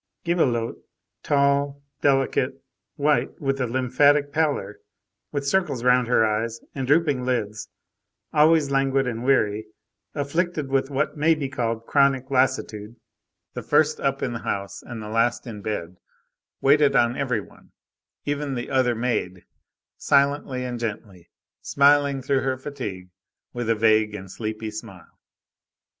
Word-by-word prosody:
Gibelotte, 130 -10 0 0.4
tall, 140 0 +1 0.2
delicate, 135 -2 +1 0.3
white 145 +1 0
with 135 -1 -1
a 125 - 0
lymphatic 140 +4 +2
pallor, 145 -10 -1 0.5
with 145 -1 -3
circles 140 -6 0
round 125 -1 +4
her 120 -2 +4
eyes, 110 +2 -1
and 135 -2 -4
drooping 145 -3 +2
lids, 110 -5 -2 0.6
always 150 -1 +4
languid 135 0 +2
and 120 -1 -3
weary, 110 -5 +1 0.5
afflicted 150 +1 -1
with 135 0 +1
what 140 +2 -1
may 160 +2 +3
be 145 -3 -3
called 115 -4 -3
chronic 140 -1 +2
lassitude, 125 -5 0 0.6
the - - -5
first 155 0 +2
up 135 0 -1
in 120 - -2
the 120 - -4
house 100 -3 -4
and 115 -3 -8
the - - -7
last 115 +3 0
in 110 -4 -8
bed, 90 -4 -4 0.6
waited 140 0 +4
on 120 -1 +3
every 125 -5 -1
one, 100 - -15 0.5
even 145 -1 -2
the 120 0 -5
other 130 -2 +2
maid, 110 -6 -2 0.5
silently 140 -2 +1
and 120 -1 -4
gently, 100 -6 -6 0.3
smiling 140 -1 +3
through 135 0 +1
her 130 -1 -1
fatigue 105 -10 -7 0.4
with 120 -2 -3
a 115 - +3
vague 110 -1 +3
and 95 -2 -9
sleepy 110 +1 -5
smile. 105 -6 -11
130 Hz, 140 wpm, -24 LUFS, 115-140 Hz, 0.6 s, round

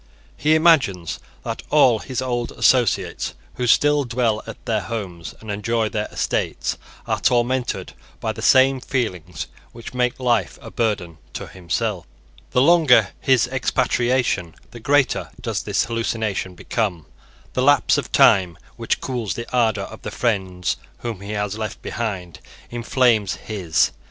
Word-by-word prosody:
He 155 +1 +3
imagines 140 - +3 0.2
that - - -4
all 130 -7 +5
his 130 +2 -4
old 120 -2 -2
associates, 125 -5 +2 0.2
who 125 - -1
still 145 +4 +4
dwell 115 -3 0
at 115 - -10
their 110 -3 0
homes 95 -5 -6
and 110 -1 -7
enjoy 110 +2 0
their 105 -1 -2
estates, - - -1 0.3
are - - -1
tormented 125 +1 0 0.3
by - - -1
the - - -8
same 130 0 +5
feelings 90 - -3 0.3
which 115 +1 -9
make 125 0 0
life 120 -3 +1
a - - -10
burden 95 -8 -1
to - - -5
himself. 95 +1 -3 0.4
The 125 - +3
longer 135 -10 +5
his 130 -3 +3
expatriation, 125 -7 0 0.2
the 120 - -10
greater 140 +3 +2
does - - -2
this - - 0
hallucination 110 -5 -2
become. 90 -4 -2 0.5
The 125 - 0
lapse 140 -1 +4
of - - -6
time, 90 -4 +5 0.2
which - - -1
cools 120 -6 -3
the 115 - -5
ardour 110 -5 +2
of - - -9
the - - -5
friends 95 -6 -1 0.2
whom 115 -5 -5
he 100 +2 -5
has 105 0 -2
left 110 -3 -4
behind, 95 -7 -4 0.3
inflames 120 -4 +2
his. 95 -7 0
115 Hz, 145 wpm, -22 LUFS, 100-125 Hz, 0.5 s, all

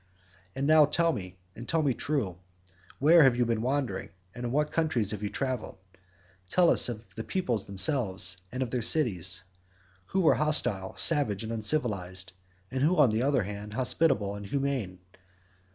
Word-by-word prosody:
"And 135 - -2
now, 155 0 +6
tell 165 +3 +1
me 95 -4 -7 0.2
and 120 - -10
tell 165 -1 +1
me 140 -3 +1
true. 115 - -3 0.6
Where 160 +4 +5
have 130 -4 +5
you 120 0 +1
been 115 -1 -1
wandering, 130 -5 -2 0.2
and 120 0 -7
in - - -4
what 150 +3 0
countries 130 -11 0
have 105 -2 -5
you 105 - -3
travelled? 130 -5 -4 0.7
Tell 175 - +4
us - - +4
of 115 -1 -7
the 110 - -6
peoples 120 - -2
themselves, 95 -2 0
and 130 +2 -2
of 125 - -7
their 125 - -1
cities—who 95 - -2
were 170 - +4
hostile, 120 -11 +2
savage 130 - +3
and 110 +1 -5
uncivilised, 100 -7 -2 0.4
and 130 - -3
who, 165 +6 +2
on 135 -7 +5
the 110 +2 0
other 135 -3 +1
hand, 105 +2 -7
hospitable 125 -5 +1
and 100 0 -8
humane. 135 -7 -2
120 Hz, 170 wpm, -28 LUFS, 100-145 Hz, 0.7 s, now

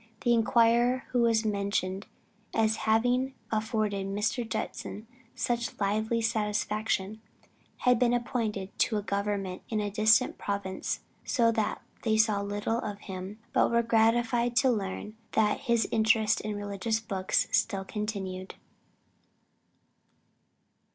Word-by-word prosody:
The 240 - +3
inquirer 235 +2 +3
who 245 - +2
was 230 -1 +3
mentioned 200 -2 -1 0.5
as 220 -1 +2
having 245 +4 +2 0.2
afforded 215 -3 -1
Mr. 210 +5 -1
Judson 215 0 -4 0.3
such 240 -1 -2
lively 220 +3 0
satisfaction, 215 -1 -1 0.6
had 250 -2 +4
been 245 -1 +3
appointed 225 -5 -2
to 220 - +2
a 205 - -2
government 200 -1 -2
in 220 - 0
a 205 -1 -2
distant 220 +4 +3
province, 200 -2 -3 0.2
so 230 -2 +2
that 220 -2 -1 0.2
they 220 -2 +1
saw 215 -2 +3
little 205 +3 -1
of 205 -3 -5
him, 190 +1 -7 0.2
but - - +4
were 235 0 +2
gratified 235 +1 +2
to 260 +1 +4
learn 210 0 -4 0.2
that 210 -1 +2
his 235 -1 +3
interest 220 -1 +3
in 210 0 -3
religious 205 +2 -2
books 195 -4 0
still 195 -1 +1
continued. 195 -3 -4
220 Hz, 125 wpm, -29 LUFS, 200-230 Hz, 0.6 s, had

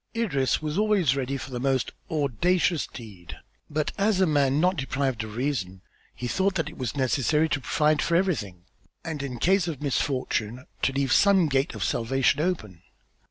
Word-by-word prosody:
Idris 155 - 0
was 155 +4 -1
always 205 - +3
ready 135 0 -2
for 130 +1 -8
the 125 - -4
most 135 0 0 0.2
audacious 160 - +1
deed, 100 -8 -11 0.3
but 150 0 -1
as 200 -1 +2
a 190 - +5
man 145 -3 +2
not 180 +3 +3
deprived 135 -4 -2
of 110 -1 -8
reason, 115 -9 -3 0.3
he 125 - -4
thought 190 +8 0
that 165 -3 -1
it 165 - -13
was 125 0 -3
necessary 145 +3 +2
to 145 -2 -1
provide 150 +3 +2
for 170 - +1
everything 115 - -1 0.4
and 160 -4 -4
in 130 -3 -5
case 185 +6 +2
of 155 -6 -4
misfortune 130 -4 -2 0.2
to - - +2
leave 135 -1 0
some 195 -4 +5
gate 135 0 0
of - - -3
salvation 135 +4 +1
open. 110 - -3
140 Hz, 175 wpm, -26 LUFS, 125-165 Hz, 0.4 s, a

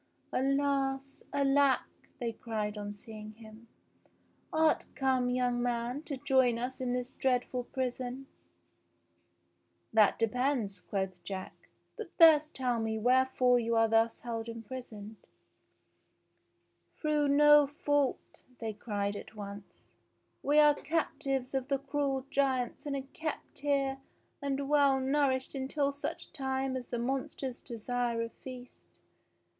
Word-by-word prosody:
"Alas! 275 0 0
Alack!" 280 -1 +3 0.3
they 235 -2 -2
cried 220 -2 -3
on 205 0 -5
seeing 215 0 -10
him. 225 +1 -14 0.8
*'Art 315 0 +2
come, 260 -2 +1
young 245 -1 +1
man, 240 +2 -1
to 300 -4 -5
join 260 -3 +3
us 250 +2 -4
in 250 -1 -1
this 250 0 -3
dreadful 250 -1 0
prison 255 +1 -3 0.8
?" - - -44
"That 215 -2 +5
depends," 230 -3 0
quoth 185 -2 -4
Jack; 190 0 -5 0.4
"but 445 -5 -6
first 310 -2 +7
tell 250 -3 0
me 220 0 -1
where 255 +4 +4
fore 250 -1 +3
you 230 0 0
are 225 0 +5
thus 225 +1 +2
held 230 -1 -4
imprisoned.''" 225 -2 -8 1.8
"Through 300 -2 +2
no 295 0 +7
fault," 290 -1 -1 0.2
they 225 -2 -4
cried 205 -1 -2
at 210 - -9
once. 200 -1 -10 0.5
"We 290 +2 +2
are 300 -1 +7
cap 315 0 -2
tives 270 -3 -2
of 265 -1 -1
the 280 -1 +1
cruel 275 -1 -1
giants 265 -1 0
and 280 - -1
are 270 - -3
kept 315 -1 -5
here 275 -2 0 0.4
and 280 0 -2
well 280 -2 +4
nourished 265 -1 +1
until 280 +1 -1
such 285 - -6
time 265 -2 -1
as 255 -2 -5
the 240 - -3
monsters 265 +1 -3
desire 240 0 -2
a 230 - -4
feast. 250 0 -12
260 Hz, 130 wpm, -31 LUFS, 230-275 Hz, 1.8 s, first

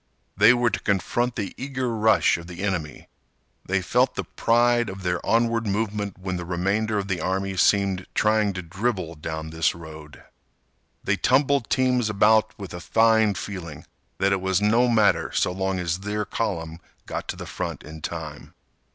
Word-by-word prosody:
They 110 - +7
were 120 -1 +2
to 95 - -2
confront 115 +5 0
the 100 -3 -4
eager 130 -2 -3
rush 110 0 +4
of 85 - -11
the 90 +2 -7
enemy. 85 -7 -3 0.6
They - - -1
felt - - +2
the - - -2
pride 120 0 +2
of 95 0 -8
their 90 -1 -1
onward 115 -1 +1
movement 105 -1 -2
when 95 -1 -4
the 90 - -5
remainder 100 +5 -1
of 100 -1 -2
the 90 -4 -2
army 95 +2 -1
seemed 95 -1 +2
trying 105 -1 +2
to 90 -1 -5
dribble 90 -2 -3
down 80 +1 -5
this 80 0 +1
road. 80 -2 -11 0.8
They - - +1
tumbled 135 -1 +2
teams 125 -3 +2
about 110 +1 +3
with 100 -4 -8
a 90 - -6
fine 110 +1 +3
feeling 85 -7 -7 0.3
that 100 0 +2
it 95 -1 +1
was 95 0 +1
no 115 +4 +3
matter 110 -4 +3
so - - +1
long 95 +1 -2
as 90 0 -2
their 105 +2 -3
column 85 -7 -3 0.3
got - - -5
to - - -4
the - - -8
front - - -5
in 80 +1 -10
time. 80 -2 -7
100 Hz, 175 wpm, -24 LUFS, 90-110 Hz, 0.8 s, They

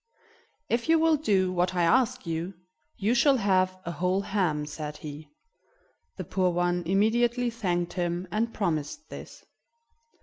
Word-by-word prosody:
"If 235 +6 -1
you 330 - +6
will 320 0 +4
do 195 -10 +1
what 180 +1 0
I 175 - +2
ask 255 +7 +2
you, 165 +3 -3 0.4
you 215 +3 +1
shall 270 +2 +4
have 185 -3 +2
a 170 - -3
whole 180 +3 0
ham," 180 -8 0
said 150 0 -6
he. 150 0 -9 0.9
The - - -4
poor 185 -1 +1
one 175 0 0
immediately 235 +5 +2
thanked 175 -6 -1
him, 175 0 -2
and 225 +4 0
promised 175 - -3
this. - - -10
185 Hz, 145 wpm, -27 LUFS, 175-235 Hz, 0.9 s, you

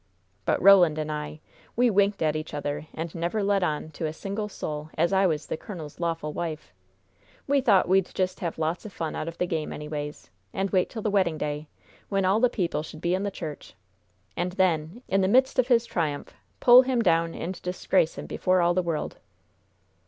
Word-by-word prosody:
"But - - +2
Roland 180 -5 +7
and 155 0 -2
I, 150 0 -5 0.3
we 245 0 +3
winked 200 -2 +2
at 155 -1 +1
each 155 -1 -5
other, 145 +1 -4
and 165 0 -5
never 175 +5 -1
let 200 0 +2
on 155 -2 -2
to 160 +1 -3
a 155 - -4
single 200 +5 -4
soul 150 -5 -5
as 170 +4 +2
I 190 0 +4
was 155 -3 -1
the - - -4
colonel's 160 -7 -9
lawful 165 -3 -2
wife. 155 - -5 0.7
We 280 0 +2
thought 200 -8 +4
we'd 190 0 +3
just 185 -1 -1
have 170 -3 -3
lots 160 +2 -1
of 215 - -8
fun 165 -3 -4
out - - -4
of 165 - -6
the 180 - +1
game, 160 -3 -3
anyways, 150 - -6 0.2
and 195 0 -1
wait 185 -2 +2
till 220 -3 -6
the 215 - 0
wedding 185 -6 +2
day, 150 0 -3 0.4
when 195 -2 +1
all 195 +4 +3
the 250 +1 +4
people 180 -9 -1
should 155 0 -9
be 175 +2 0
in 185 - 0
the 200 - -1
church, 160 - -8 0.6
and 180 +1 -2
then 180 +3 0
in 195 0 +2
the 190 - +2
midst 260 +5 +3
of 250 - +3
his 240 -2 +4
triumph 155 -8 -3 0.3
pull 245 +1 +9
him 255 -2 0
down 165 -2 +2
and 185 +2 -5
disgrace 180 -2 0
him - - -6
before 185 0 +1
all 175 0 +3
the 185 - +2
world. 165 -3 -3
175 Hz, 210 wpm, -26 LUFS, 155-195 Hz, 0.7 s, pull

